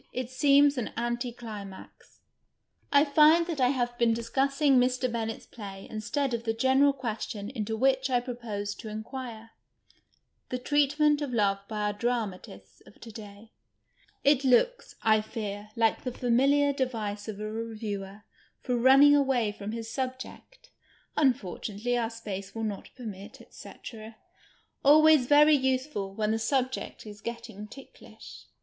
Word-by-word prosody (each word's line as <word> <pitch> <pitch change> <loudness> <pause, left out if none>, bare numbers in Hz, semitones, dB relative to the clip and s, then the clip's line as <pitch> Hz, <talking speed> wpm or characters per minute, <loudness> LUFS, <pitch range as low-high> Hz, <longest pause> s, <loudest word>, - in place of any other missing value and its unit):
It 255 0 -4
seems 280 +1 +4
an 235 - -2
anti 240 +1 -2
climax. 210 -5 -11 0.7
I 285 +1 +5
find 310 +3 +5
that 325 -5 -3
I 250 - +5
have 245 -2 -1
been 230 -1 +3
discussing 275 +4 +1
Mr. 250 0 +1
Bennett's 225 -1 -4
play 195 -3 -9
instead 225 +5 -2
of 230 -1 -2
the 225 -1 -1
general 265 +4 +4
question 225 -5 -5
into 220 -3 -3
which 265 +2 +2
I 250 -1 +3
proposed 225 -5 -5
to 220 - -7
inquire 225 +1 -7 0.5
— - - -44
the 250 - -2
treatment 290 +3 +2
of 285 -3 -3
love 200 -3 +2
by 215 -1 -4
our 210 0 0
dramatists 200 - -4
of - - -18
to 230 - -10
day. 210 0 -12 0.7
It 280 -1 +4
looks, 470 - +2
I 215 -1 +4
fear, 210 -1 -6
like 225 -1 +1
the 255 - -2
fami 245 +2 +2
liar 285 0 +3
device 220 -6 -3
of 210 -2 -6
a 215 0 -4
reviewer 215 -3 -6 0.4
for 250 - -1
running 270 +4 +6
away 265 -6 +2
from 205 0 -7
his 225 0 -6
subject 260 - -7 0.2
— - - -32
" - - -40
imfortunately, 240 - 0
our 225 - -1
space 200 -4 -7
will 225 - -3
not 205 -3 -4
permit, 205 -5 -9
&c. - - -11 0.5
' - - -33
— - - -40
always 305 -2 +6
very 295 +2 +6
usefid 260 -7 -1
when 215 0 0
the 225 - 0
subject 255 +2 -2
is 205 -1 -10
getting 230 -3 -7
ticklish. 275 - -13
235 Hz, 155 wpm, -28 LUFS, 215-270 Hz, 0.7 s, running